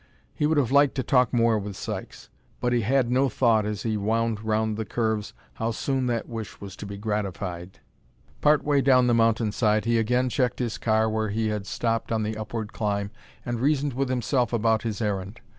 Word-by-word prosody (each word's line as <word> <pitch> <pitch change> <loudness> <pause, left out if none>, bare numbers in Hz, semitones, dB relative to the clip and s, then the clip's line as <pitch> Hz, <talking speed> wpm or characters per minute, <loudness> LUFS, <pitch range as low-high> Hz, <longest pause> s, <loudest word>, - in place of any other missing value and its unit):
He 150 - 0
would 160 0 +1
have 130 -5 +2
liked 140 0 +4
to 130 - -1
talk 125 -2 +3
more 115 -2 +3
with 100 -1 -6
Sykes. - - -7 0.3
But 125 0 0
he 120 - +2
had 125 +2 +1
no 130 +2 +3
thought 115 -4 +2
as 105 -2 -4
he 110 -2 0
wound 110 +1 0
round 110 0 0
the 110 - -2
curves 110 -1 -2 0.2
how 115 - -2
soon 130 +2 -1
that 120 -2 -1
wish 115 -3 -7
was 100 -2 -8
to 105 - -7
be 100 0 -7
gratified. 95 -4 -4 0.6
Part 150 0 +4
way 145 -2 +2
down 130 -2 +5
the 120 - +3
mountainside 110 -1 +2
he 115 0 +2
again 125 +3 +1
checked 125 -1 0
his 120 -3 -3
car 110 0 +2
where 110 -1 -1
he 110 +1 -1
had 105 -2 -3
stopped 115 +1 -1
on 110 -1 +1
the 110 +1 -2
upward 110 0 -5
climb 100 -1 -2 0.3
and 120 -1 -2
reasoned 140 +1 +1
with 135 +1 -1
himself 125 -1 0
about 115 -1 +2
his 110 -1 -3
errand. 100 +1 -3
115 Hz, 205 wpm, -25 LUFS, 105-125 Hz, 0.6 s, down